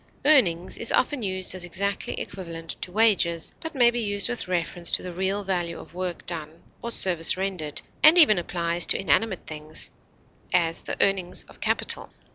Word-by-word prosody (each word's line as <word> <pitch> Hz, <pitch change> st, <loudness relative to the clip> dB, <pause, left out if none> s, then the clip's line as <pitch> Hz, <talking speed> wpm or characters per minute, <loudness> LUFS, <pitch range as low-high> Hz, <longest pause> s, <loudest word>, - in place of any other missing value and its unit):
Earnings 185 Hz, -, +3 dB
is 230 Hz, -, +2 dB
often 265 Hz, 0 st, +1 dB
used 190 Hz, -3 st, 0 dB
as 185 Hz, -1 st, -5 dB
exactly 195 Hz, +3 st, -2 dB
equivalent 165 Hz, -4 st, -7 dB
to 180 Hz, -, -5 dB
wages, 185 Hz, -6 st, +2 dB
but 320 Hz, -1 st, -7 dB
may 240 Hz, -2 st, +5 dB
be 240 Hz, -, -3 dB
used 205 Hz, -3 st, +1 dB
with 240 Hz, -, -1 dB
reference 175 Hz, -1 st, -2 dB
to -, -, 0 dB
the 180 Hz, -, -6 dB
real 190 Hz, +3 st, -1 dB
value 175 Hz, -3 st, -2 dB
of -, -, -13 dB
work 180 Hz, -1 st, -5 dB
done 165 Hz, -1 st, -6 dB, 0.2 s
or 235 Hz, -, -4 dB
service 180 Hz, -7 st, +2 dB
rendered, 185 Hz, -6 st, -4 dB, 0.2 s
and 315 Hz, +3 st, +8 dB
even 215 Hz, -, +7 dB
applied 170 Hz, 0 st, -3 dB
to -, -, +3 dB
inanimate 195 Hz, +3 st, 0 dB
things; 155 Hz, 0 st, -4 dB, 0.6 s
as, 165 Hz, -2 st, +1 dB
the -, -, -5 dB
earnings 190 Hz, -3 st, 0 dB
of -, -, -18 dB
capital. -, -, -1 dB
185 Hz, 175 wpm, -25 LUFS, 170-205 Hz, 0.6 s, and